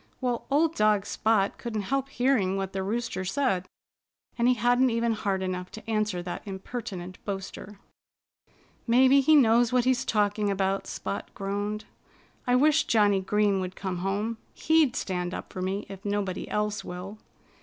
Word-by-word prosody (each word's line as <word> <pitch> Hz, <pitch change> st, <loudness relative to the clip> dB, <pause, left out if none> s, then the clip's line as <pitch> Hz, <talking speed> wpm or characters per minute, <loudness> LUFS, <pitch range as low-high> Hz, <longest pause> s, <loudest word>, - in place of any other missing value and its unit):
Well, 245 Hz, -2 st, -2 dB
old 310 Hz, +3 st, +3 dB
dog 210 Hz, -5 st, +2 dB
Spot 215 Hz, -3 st, +1 dB
couldn't 220 Hz, -4 st, -3 dB
help 275 Hz, 0 st, 0 dB
hearing 245 Hz, -8 st, +1 dB
what 195 Hz, -1 st, -3 dB
the 190 Hz, -, -2 dB
Rooster 220 Hz, 0 st, -2 dB
said. 190 Hz, -3 st, 0 dB, 0.7 s
And 235 Hz, 0 st, +2 dB
he 250 Hz, -, +4 dB
hadn't 245 Hz, +2 st, +3 dB
even 230 Hz, 0 st, +1 dB
heart 200 Hz, -3 st, -1 dB
enough 180 Hz, -1 st, -3 dB
to 220 Hz, -, -10 dB
answer 215 Hz, -5 st, -1 dB
that 175 Hz, -, -5 dB
impertinent 190 Hz, -2 st, -7 dB
boaster. 195 Hz, 0 st, -6 dB, 1.1 s
"Maybe 260 Hz, +4 st, +6 dB
he 310 Hz, +3 st, +5 dB
knows 240 Hz, -3 st, +5 dB
what 250 Hz, -1 st, +2 dB
he's 255 Hz, -1 st, +2 dB
talking 205 Hz, -1 st, +1 dB
about," 195 Hz, 0 st, 0 dB
Spot -, -, -5 dB
groaned. 205 Hz, +2 st, -3 dB, 0.6 s
"I 245 Hz, -, +4 dB
wish 305 Hz, +4 st, +4 dB
Johnnie 205 Hz, -3 st, +3 dB
Green 205 Hz, 0 st, +2 dB
would 185 Hz, 0 st, -4 dB
come 185 Hz, -2 st, -4 dB
home. 205 Hz, +5 st, -2 dB, 0.2 s
He'd 315 Hz, -5 st, +3 dB
stand 180 Hz, -1 st, -2 dB
up -, -, -8 dB
for 185 Hz, -, -5 dB
me, 195 Hz, +2 st, -2 dB
if 195 Hz, 0 st, -10 dB
nobody 205 Hz, -3 st, -2 dB
else 210 Hz, 0 st, -1 dB
will." 185 Hz, +4 st, -7 dB
210 Hz, 160 wpm, -27 LUFS, 195-240 Hz, 1.1 s, Maybe